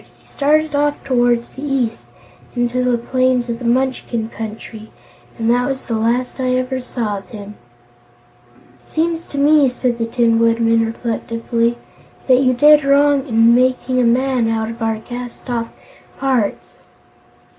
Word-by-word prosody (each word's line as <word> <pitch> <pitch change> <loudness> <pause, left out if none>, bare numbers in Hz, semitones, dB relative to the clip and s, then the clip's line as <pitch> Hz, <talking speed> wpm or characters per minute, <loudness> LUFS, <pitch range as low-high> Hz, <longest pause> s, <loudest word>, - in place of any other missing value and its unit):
He - - -29
started 305 +2 +1
off 290 0 0
toward 240 -2 +2
the 265 - -13
east, 260 -5 -2 0.5
into 245 +1 0
the 250 -1 +1
plains 255 0 0
of 230 0 -3
the 245 - -7
Munchkin 240 -2 -1
Country, 220 0 -8 0.5
and 225 -2 -2
that 245 +1 +1
was 265 -1 -4
the 235 - -4
last 235 +4 -1
I 255 -1 0
ever 255 0 -2
saw 225 -5 -3
of 195 - -18
him." 205 -1 -9 1.3
"It - - -28
seems 330 +1 -2
to 285 - -8
me," 290 -1 +4
said 250 -1 -2
the 230 - -1
Tin 230 -1 +2
Woodman 230 0 +2
reflectively, 230 +1 -2 0.5
"that 255 -1 +4
you 255 -1 +3
did 295 +3 +6
wrong 280 0 +3
in 230 -1 +4
making 255 +1 +1
a - - +3
man 250 0 +2
out 220 0 -1
of 230 +1 -11
our 225 -1 0
cast 245 +2 -9
off 230 -1 -2 0.5
parts. 255 -6 -2
245 Hz, 155 wpm, -18 LUFS, 230-260 Hz, 1.3 s, did